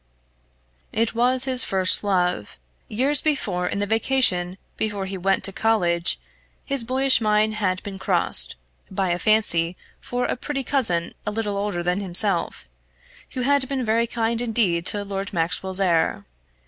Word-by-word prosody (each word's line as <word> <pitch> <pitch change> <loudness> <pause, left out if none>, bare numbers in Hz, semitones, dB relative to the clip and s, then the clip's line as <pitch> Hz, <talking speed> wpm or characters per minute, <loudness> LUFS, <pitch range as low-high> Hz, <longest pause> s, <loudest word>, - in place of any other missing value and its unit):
It 225 0 0
was 250 +2 +2
his 255 -2 +3
first 190 0 +2
love. 180 - -1 0.3
Years 275 +6 +3
before, 195 - -1
in - - -3
the 205 - -1
vacation 205 -5 +1 0.2
before 205 -3 -3
he 190 +1 -6
went 190 +1 0
to 195 0 -2
college, 175 -7 +1 0.5
his 275 -3 -1
boyish 260 +1 +3
mind 215 0 +2
had 185 -4 -2
been 200 -2 -7
crossed, - - +2 0.3
by 190 -1 -1
a 175 - -1
fancy 180 -6 +2 0.2
for 245 0 -3
a - - -1
pretty 275 +2 -4
cousin 180 -13 0
a - - +2
little 210 -1 -3
older 200 -3 -2
than 180 +2 0
himself, 175 - +1 0.7
who 255 - -3
had 275 0 +2
been 265 -3 -2
very 230 +2 +1
kind 230 0 -1
indeed 210 -8 +1
to 205 -1 -2
Lord 195 0 -5
Maxwell's 185 +3 -1
heir. 165 - +1
205 Hz, 155 wpm, -23 LUFS, 180-235 Hz, 0.7 s, his